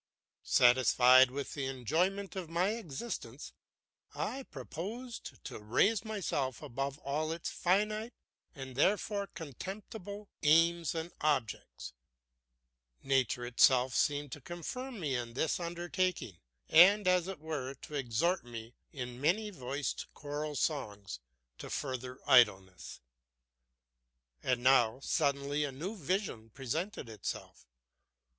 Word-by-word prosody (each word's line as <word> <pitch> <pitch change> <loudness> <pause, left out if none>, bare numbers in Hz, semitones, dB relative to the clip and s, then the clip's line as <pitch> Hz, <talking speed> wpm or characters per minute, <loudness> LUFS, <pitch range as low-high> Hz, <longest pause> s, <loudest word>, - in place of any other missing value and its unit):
Satisfied 125 +1 +6
with 140 +2 -5
the 140 -2 -3
enjoyment 175 - -1
of 185 -4 -5
my 175 +4 +1
existence, 220 - -5 0.6
I 270 - -3
proposed 205 - -7
to - - -7
raise 190 - +2
myself 165 - -2
above 135 +3 -3
all 155 +3 -2
its 165 +1 -4
finite, 215 +5 0 0.4
and 135 -2 -8
therefore 200 - +1
contemptible, 195 - -8
aims 165 +2 +4
and 165 +1 -3
objects. 130 - -1 1.1
Nature 130 -2 +1
itself 125 +1 +4
seemed 145 -1 +1
to 145 - -7
confirm 220 - -6
me 150 -6 -1
in 120 -2 -3
this 160 - 0
undertaking, 175 - -2 0.3
and, 195 +4 +7
as 180 -1 +3
it 190 -1 -5
were, 145 -4 -4
to - - -10
exhort 140 +7 0
me 115 -1 -9 0.2
in 125 -2 -6
many 210 +8 +1
voiced 140 - -4
choral 150 0 -4
songs 105 - -2 0.4
to - - -7
further 130 -2 -4
idleness. 95 -9 +3 1.4
And 125 -1 0
now 125 -2 +5
suddenly 140 -1 0
a 145 - -2
new 170 +11 -5
vision 180 - -2
presented 140 - -4
itself. 110 - -6
145 Hz, 115 wpm, -33 LUFS, 130-185 Hz, 1.4 s, and